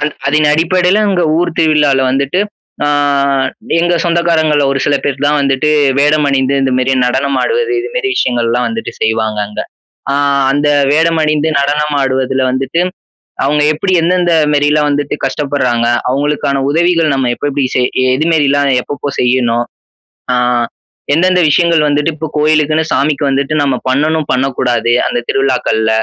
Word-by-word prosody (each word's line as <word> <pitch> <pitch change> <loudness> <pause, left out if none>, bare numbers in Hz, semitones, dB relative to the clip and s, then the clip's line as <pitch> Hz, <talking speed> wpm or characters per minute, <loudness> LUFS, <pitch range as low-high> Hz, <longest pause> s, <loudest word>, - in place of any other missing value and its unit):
அத 150 - 0 0.2
அதன் 150 +1 +2
அடிப்படையில 180 +5 +2
இங்க 180 -2 0 0.2
ஊர் 170 -1 -2
திருவிழால 150 -4 +2
வந்துட்டு 140 +7 0 0.5
அ - - +1 0.9
எங்க 175 +1 +1
சொந்தக்காரங்கள்ல 165 -4 +1
ஒரு 135 - -1
சில 145 - +1
பேருக்கு 140 0 -2
தான் 150 0 +2
வந்துட்டு 135 +2 0 0.3
வேடம் 150 +1 +2
அணிந்து 135 0 0
இந்த 130 - 0
மாரி 130 +1 0
நடனம் 135 +2 -1
ஆடுவது, 465 -3 -1
இது 410 - -5
மாரி 395 -5 -1
விஷயங்கள்லாம் 120 - 0
வந்துட்டு 115 0 -5
செய்வாங்க 110 -1 -1
அங்க. 105 - -7 0.5
அ - - 0 0.4
அந்த 145 +1 0 0.2
வேடம் 165 +1 +2
அணிந்து 155 +1 0
நடனம் 145 +1 0
ஆடுவதுல 130 0 0
வந்துட்டு 135 +6 -1 0.7
அவங்க 150 +2 +1
எப்படி 185 +5 -1
எந்தெந்த 175 0 +1 0.2
மாரிலாம் 150 +1 +2
வந்துட்டு 145 0 -1
கஷ்டப்படுறாங்க, 130 -5 -1 0.2
அவங்களுக்கான 140 0 -1
உதவிகள் 165 0 +1
நம்ம 130 -2 0
எப்ப - - -6
எப்படி 140 -1 -1
செய் 125 -1 +2 0.3
எது 155 - -1
மாரிலாம் 145 -2 +2
எப்பப்போ 145 +1 -5
செய்யணும், 120 -1 +1 0.7
ஆ - - +1 0.8
எந்தெந்த 180 +2 +2
விஷயங்கள் 165 0 +2
வந்துட்டு 150 +2 0
இப்போ 160 0 -5
கோயிலுக்குன்னு 155 +1 +1
சாமிக்கு 145 0 0
வந்துட்டு 140 +3 -1
நம்ம 135 -2 0
பண்ணணும் 155 +3 0
பண்ணக்கூடாது 125 -2 0
அந்த 120 - -2
திருவிழாக்கள்ல, 125 -5 0
145 Hz, 145 wpm, -13 LUFS, 135-160 Hz, 0.9 s, அதன்